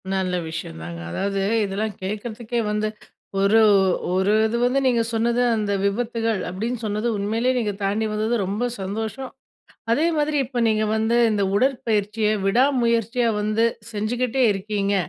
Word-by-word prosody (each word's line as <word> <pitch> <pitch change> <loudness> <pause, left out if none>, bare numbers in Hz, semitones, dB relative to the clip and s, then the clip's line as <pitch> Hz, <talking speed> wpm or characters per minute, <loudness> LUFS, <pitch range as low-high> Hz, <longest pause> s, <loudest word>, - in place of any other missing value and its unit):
நல்ல 185 -1 0
விஷயம்தாங்க. 85 - -6
அதாவது 195 - -2 0.3
இதெல்லாம் 205 +2 -3
கேட்கறதுக்கே 220 +4 -4
வந்து 210 0 0 0.5
ஒரு 200 +3 +4 0.5
ஒரு 190 +2 +2
இது 225 +2 0
வந்து 255 +2 +2
நீங்க 240 -2 +3
சொன்னது 235 +2 +1
அந்த 210 -2 -1
விபத்துகள், 225 0 -1
அப்டின்னு 225 +6 -4
சொன்னது 210 +2 -1
உண்மையிலேயே 225 +5 0
நீங்க 210 -4 -1
தாண்டி 205 +3 0
வந்தது 220 +3 0
ரொம்ப 205 +5 -2 0.2
சந்தோஷம். 220 +6 -4 0.6
அதே 295 +8 +3
மாதிரி 300 0 +1
இப்ப 245 -1 -3
நீங்க 215 0 +1
வந்து 220 +2 +1
இந்த 210 -2 0
உடற்பயிற்சிய, 220 -3 +1 0.2
விடா 235 +7 +4 0.2
முயற்சியா 235 +1 +1
வந்து 215 +2 +1 0.3
செஞ்சுகிட்டே 245 +4 -1
இருக்கீங்க. 200 0 -1
220 Hz, 135 wpm, -23 LUFS, 200-235 Hz, 0.6 s, ஒரு